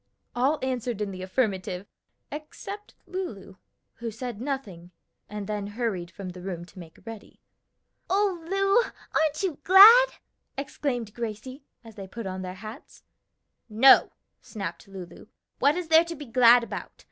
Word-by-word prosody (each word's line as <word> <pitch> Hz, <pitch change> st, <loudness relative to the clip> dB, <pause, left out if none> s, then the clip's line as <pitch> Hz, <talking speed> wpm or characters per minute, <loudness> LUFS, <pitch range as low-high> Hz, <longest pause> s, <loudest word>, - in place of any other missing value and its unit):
All 270 Hz, +5 st, +2 dB
answered 250 Hz, -4 st, -2 dB
in 205 Hz, -2 st, -2 dB
the 185 Hz, -1 st, -8 dB
affirmative, 190 Hz, -2 st, -2 dB, 0.5 s
except 390 Hz, +7 st, -8 dB
Lulu, 220 Hz, -, -6 dB, 0.4 s
who 230 Hz, 0 st, -4 dB
said 230 Hz, 0 st, -6 dB
nothing, 220 Hz, -11 st, -5 dB, 0.4 s
and 210 Hz, -1 st, -5 dB
then 205 Hz, 0 st, -3 dB
hurried 205 Hz, -5 st, -3 dB
from 185 Hz, +2 st, -8 dB
the 180 Hz, 0 st, -10 dB
room 175 Hz, -2 st, -5 dB
to 185 Hz, -, -15 dB
make 165 Hz, -2 st, -12 dB
ready. 225 Hz, -2 st, -10 dB, 0.7 s
"O 380 Hz, -3 st, +1 dB
Lu, 390 Hz, +5 st, +2 dB, 0.3 s
aren't 310 Hz, +2 st, +1 dB
you 350 Hz, -7 st, -2 dB
glad?" 435 Hz, +7 st, +9 dB, 0.5 s
exclaimed 255 Hz, -5 st, -3 dB
Gracie, 240 Hz, +5 st, -6 dB, 0.2 s
as 225 Hz, -1 st, -13 dB
they 195 Hz, -2 st, -9 dB
put 230 Hz, +3 st, -8 dB
on 190 Hz, 0 st, -4 dB
their 185 Hz, 0 st, -6 dB
hats. 215 Hz, +4 st, -11 dB, 0.7 s
"No!" 235 Hz, +5 st, +6 dB, 0.3 s
snapped 205 Hz, -3 st, -7 dB
Lulu, 190 Hz, -3 st, -11 dB, 0.3 s
"what 285 Hz, +2 st, +4 dB
is 355 Hz, -2 st, -4 dB
there 320 Hz, +1 st, +6 dB
to 335 Hz, 0 st, -6 dB
be 295 Hz, -1 st, -9 dB
glad 240 Hz, 0 st, +6 dB
about? -, -, -6 dB
235 Hz, 145 wpm, -26 LUFS, 195-300 Hz, 0.7 s, glad